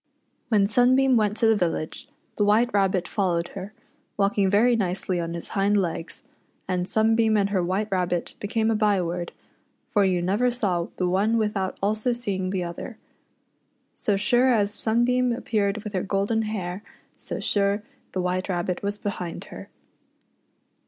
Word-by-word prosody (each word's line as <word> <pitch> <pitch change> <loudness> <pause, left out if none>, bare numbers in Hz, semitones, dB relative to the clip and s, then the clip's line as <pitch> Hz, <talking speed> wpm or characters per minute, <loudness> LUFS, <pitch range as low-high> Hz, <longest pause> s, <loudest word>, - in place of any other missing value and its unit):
When 210 -4 +4
Sunbeam 255 +4 +4
went 210 -2 +2
to 230 - +2
the 225 0 +5
village, 170 -5 -2 0.3
the 210 - +1
White 220 +4 +3
Rabbit 195 -3 +1
followed 175 -4 0
her, 195 +3 -7 0.5
walking 200 -1 +2
very 230 +5 +4
nicely 185 -3 -1
on 170 0 -3
his 170 - -7
hind 200 +1 +2
legs, 170 -3 -3 0.4
and 180 -1 -1
"Sunbeam 220 0 +3
and 200 0 +1
her 190 -3 +2
White 190 +4 -1
Rabbit 180 -2 -1
" - - -37
became 220 +2 0
a - - +1
byword, 180 -5 0 0.6
for 205 -3 +2
you 180 -2 +1
never 205 +8 +2
saw 195 -8 -1
the 180 - 0
one 200 +5 +2
without 210 -4 -1
also 215 +4 +1
seeing 195 -6 -2
the 185 -1 -1
other. 175 +7 -7 1.0
So 205 -2 0
sure 240 +5 +3
as 210 -3 +2
Sunbeam 240 +3 +1
appeared 210 -3 -1
with 210 -2 -6
her 185 - 0
golden 200 +3 0
hair, 185 -3 -4 0.3
so - - -6
sure 200 0 +1 0.3
the 185 - -1
White 180 +1 -1
Rabbit 180 0 -2
was 205 +1 -2
behind 185 -4 -5
her. - - -9
200 Hz, 160 wpm, -25 LUFS, 185-220 Hz, 1.0 s, the